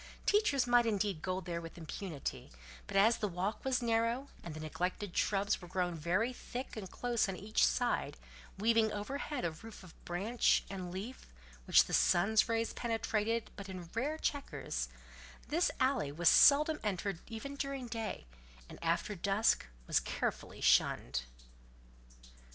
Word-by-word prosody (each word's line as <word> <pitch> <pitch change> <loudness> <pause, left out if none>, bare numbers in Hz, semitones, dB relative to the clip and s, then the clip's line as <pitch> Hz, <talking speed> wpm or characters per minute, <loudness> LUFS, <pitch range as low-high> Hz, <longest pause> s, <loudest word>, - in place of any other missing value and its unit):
Teachers 410 -12 +3
might 240 -1 +4
indeed 200 -6 0
go 185 +1 -2
there 170 -2 -4
with 165 +1 -9
impunity; 165 -2 -5 0.4
but - - -1
as 220 +4 +5
the 210 - -1
walk 190 +3 -3
was 255 -2 0
narrow, 230 +4 +1
and 165 -3 -7
the - - -6
neglected 175 +4 -3
shrubs 200 0 +1
were 175 - -9
grown 180 0 -1
very 180 +10 0
thick 250 +1 -6
and 200 -4 -6
close 235 -2 0
on 190 - -3
each 210 +4 0
side, 245 -1 +1 0.4
weaving 220 +1 +3
overhead 260 - -3
a 170 - 0
roof 210 +6 -11
of 175 -3 -13
branch 205 +7 +2
and 185 -2 -5
leaf 205 +8 -7 0.4
which - - +7
the - - -7
sun's 200 +6 +4
rays 230 0 0
penetrated 225 -1 -1
but 200 -1 -8
in 180 -3 -8
rare 285 +7 -1
chequers, - - -3 0.6
this 335 +4 +2
alley 255 - +1
was 170 +3 +4
seldom 300 +2 +6
entered 195 -3 -2
even 235 +5 -6
during 275 -2 -3
day, 225 - -4 0.4
and - - -11
after 170 +5 0
dusk 200 - +1 0.2
was - - +3
carefully - - -3
shunned. 65 -1 +3
210 Hz, 150 wpm, -34 LUFS, 180-240 Hz, 0.6 s, which